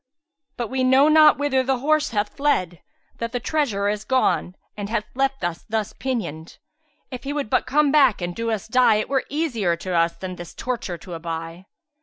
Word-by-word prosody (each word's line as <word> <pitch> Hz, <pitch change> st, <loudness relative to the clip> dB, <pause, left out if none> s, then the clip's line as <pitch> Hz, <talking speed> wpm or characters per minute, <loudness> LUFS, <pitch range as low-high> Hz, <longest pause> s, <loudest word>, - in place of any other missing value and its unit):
But 240 Hz, -3 st, -3 dB
we 260 Hz, 0 st, -1 dB
know 265 Hz, +3 st, +5 dB
not 310 Hz, -1 st, +7 dB
whither 280 Hz, -2 st, +1 dB
the 260 Hz, 0 st, 0 dB
horse 305 Hz, +4 st, +1 dB
hath 210 Hz, -2 st, -2 dB
fled, 185 Hz, -, 0 dB, 0.4 s
that 230 Hz, +1 st, -4 dB
the 245 Hz, -, -1 dB
treasurer 235 Hz, -8 st, 0 dB
is 210 Hz, 0 st, -1 dB
gone 215 Hz, -6 st, +1 dB, 0.2 s
and 205 Hz, -1 st, -5 dB
hath 225 Hz, -1 st, -1 dB
left 270 Hz, -1 st, -1 dB
us 175 Hz, -1 st, -3 dB
thus 215 Hz, -2 st, -2 dB
pinioned. 210 Hz, -, -4 dB, 0.5 s
If 255 Hz, -, -7 dB
he 280 Hz, -, -4 dB
would 285 Hz, -7 st, -3 dB
but -, -, +2 dB
come 290 Hz, +2 st, +3 dB
back 275 Hz, -7 st, +4 dB
and 175 Hz, -1 st, -4 dB
do 230 Hz, 0 st, -2 dB
us 220 Hz, -3 st, -2 dB
die, 250 Hz, -1 st, +4 dB
it 215 Hz, -, -1 dB
were 270 Hz, -1 st, 0 dB
easier 245 Hz, -, 0 dB
to 180 Hz, +2 st, -5 dB
us 170 Hz, 0 st, +2 dB
than 185 Hz, -1 st, -7 dB
this 175 Hz, -1 st, -9 dB
torture 235 Hz, -8 st, -4 dB
to 180 Hz, +1 st, -10 dB
aby." 165 Hz, +2 st, -6 dB
230 Hz, 200 wpm, -23 LUFS, 185-270 Hz, 0.5 s, not